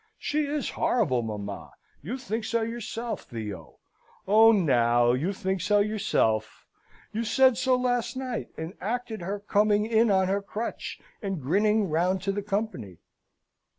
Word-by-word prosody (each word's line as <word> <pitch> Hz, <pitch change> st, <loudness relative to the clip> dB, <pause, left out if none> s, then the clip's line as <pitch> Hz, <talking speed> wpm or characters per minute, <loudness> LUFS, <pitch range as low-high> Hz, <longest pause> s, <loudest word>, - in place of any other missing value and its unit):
She 300 Hz, 0 st, -1 dB
is 290 Hz, -1 st, -2 dB
horrible, 150 Hz, -, +1 dB
mamma. 105 Hz, -3 st, -6 dB, 0.3 s
You 215 Hz, -, -4 dB
think 230 Hz, -3 st, -4 dB
so 230 Hz, +1 st, 0 dB
yourself, 230 Hz, 0 st, -4 dB
Theo! 105 Hz, -, -7 dB, 0.5 s
Own, 215 Hz, -2 st, +6 dB
now, 120 Hz, -3 st, +4 dB
you 145 Hz, +10 st, 0 dB
think 190 Hz, -1 st, -2 dB
so 205 Hz, +3 st, +3 dB
yourself! 200 Hz, -, 0 dB, 0.5 s
You 225 Hz, +2 st, -1 dB
said 260 Hz, +2 st, +4 dB
so 255 Hz, +1 st, +2 dB
last 250 Hz, 0 st, -1 dB
night, 255 Hz, -3 st, -4 dB
and 160 Hz, +3 st, -5 dB
acted 230 Hz, 0 st, -3 dB
her 195 Hz, +4 st, -3 dB
coming 210 Hz, +1 st, +2 dB
in 225 Hz, 0 st, +3 dB
on 190 Hz, -2 st, +3 dB
her 200 Hz, +2 st, 0 dB
crutch, 215 Hz, +3 st, -5 dB, 0.2 s
and 195 Hz, -5 st, -3 dB
grinning 205 Hz, +9 st, +2 dB
round 180 Hz, +4 st, 0 dB
to 195 Hz, -, 0 dB
the 205 Hz, +1 st, -2 dB
company." 195 Hz, -, -3 dB
205 Hz, 150 wpm, -27 LUFS, 160-230 Hz, 0.5 s, Own